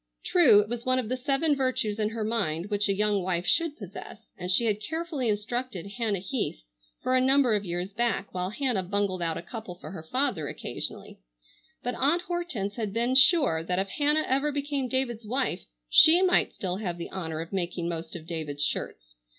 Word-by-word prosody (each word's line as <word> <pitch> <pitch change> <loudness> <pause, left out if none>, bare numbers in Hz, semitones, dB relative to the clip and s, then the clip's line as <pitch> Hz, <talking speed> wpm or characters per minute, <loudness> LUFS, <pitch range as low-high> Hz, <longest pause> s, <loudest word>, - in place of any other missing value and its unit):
True, 265 - +6
it 210 - -5
was 235 +1 -4
one 255 0 +2
of 245 -4 -2
the 255 - 0
seven 275 +4 +1
virtues 255 -5 -1
in 210 0 +1
her 225 0 -4
mind 205 -5 -1
which 205 0 +1
a 195 - +2
young 210 0 +2
wife 180 -1 -1
should 330 - +2
possess, 205 +2 -10
and 180 0 -6
she 230 +5 +4
had 210 -2 0
carefully 320 - -3
instructed 215 -2 -3
Hannah 210 0 -1
Heath 190 - -3 0.4
for 255 - +1
a 255 - +4
number 265 -2 +4
of 205 -1 0
years 175 +2 -4
back, 235 -3 -1
while 180 0 -2
Hannah 245 -2 0
bungled 190 -1 -1
out 165 -2 -1
a - - -6
couple 215 -1 -8
for 180 - -10
her 185 -4 -7
father 200 - 0
occasionally, - - -6 0.6
but 245 - -2
Aunt 300 +8 +2
Hortense 345 - -3
had 215 -4 -3
been 235 +3 +1
sure 270 - +6
that 180 +2 -2
if 195 +1 -1
Hannah 300 +5 +1
ever 275 +3 +1
became 285 -2 -2
David's 240 -4 -1
wife 250 -5 -1 0.2
she 330 - +7
might 365 -1 +3
still 185 -1 -3
have 180 -5 -3
the 170 - -7
honor 160 -4 -4
of 165 +4 -7
making 175 -2 -2
most 165 -1 -5
of 160 -2 -8
David's 155 -4 -3
shirts. - - -3
215 Hz, 200 wpm, -27 LUFS, 180-260 Hz, 0.6 s, she